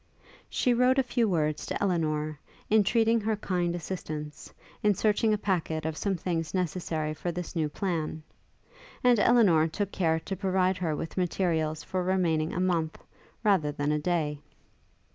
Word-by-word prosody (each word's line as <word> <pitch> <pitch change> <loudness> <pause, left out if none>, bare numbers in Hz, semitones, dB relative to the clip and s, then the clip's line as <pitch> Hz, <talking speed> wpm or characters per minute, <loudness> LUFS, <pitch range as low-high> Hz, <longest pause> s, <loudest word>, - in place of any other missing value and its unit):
She 250 - +2
wrote 250 +2 +3
a 270 - +4
few 240 -3 +1
words 155 -4 0
to - - -2
Elinor, 155 -5 0 0.3
entreating 225 +2 +4
her 215 +1 0
kind 180 -4 -1
assistance, 155 -4 -6 0.3
in 210 -1 +3
searching 215 +2 +2
a 210 - +2
packet 165 -6 -1
of 160 -1 -2
some 195 +3 -1
things 165 -1 -2
necessary 165 -4 -1
for 175 +3 -3
this 175 +1 -6
new 155 -2 0
plan; 160 -2 -3 0.8
and 245 -3 +5
Elinor 200 -9 +5
took 200 +5 -3
care 160 -4 +1
to 195 +4 -4
provide 185 -1 +1
her 165 -4 -1
with 160 +4 -6
materials 165 -4 0
for 185 -1 -2
remaining 170 -4 +1
a - - -3
month, 170 -4 0 0.5
rather 190 -9 +3
than 145 0 -1
a 150 - +1
day. 150 -3 -1
175 Hz, 160 wpm, -28 LUFS, 155-200 Hz, 0.8 s, and